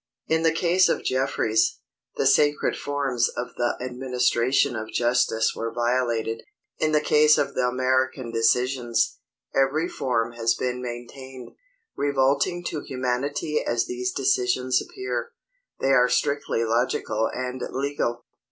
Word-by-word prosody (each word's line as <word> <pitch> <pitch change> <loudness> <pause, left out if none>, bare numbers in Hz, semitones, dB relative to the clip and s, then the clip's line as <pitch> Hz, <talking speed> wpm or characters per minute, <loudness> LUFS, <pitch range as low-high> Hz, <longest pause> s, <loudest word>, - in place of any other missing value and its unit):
In 160 0 +1
the 165 0 +3
case 175 +3 +3
of - - 0
Jeffries, 110 -4 +1 0.4
the - - 0
sacred 145 +2 +3
forms 135 -4 -1
of 125 - -3
the 120 - 0
administration 125 0 +1
of 110 0 -5
justice 120 -2 +1
were 115 0 -3
violated. 120 -1 -1 0.4
In 155 - +1
the 150 -1 +3
case 150 0 +5
of - - 0
the 125 - +1
American 130 0 0
decisions, 120 +1 +1 0.3
every 135 +5 +2
form 120 -7 -1
has 115 -1 0
been 125 +1 -3
maintained. 125 +1 -8 0.4
Revolting 140 +5 +1
to 150 - -4
humanity 135 +4 -2
as 120 0 0
these 125 0 -3
decisions 125 -1 +1
appear, 400 +4 -5 0.5
they 135 - +1
are 125 -2 +5
strictly 140 -2 0
logical 115 -1 0
and 125 0 -4
legal. 130 -3 -2
125 Hz, 130 wpm, -24 LUFS, 120-140 Hz, 0.5 s, case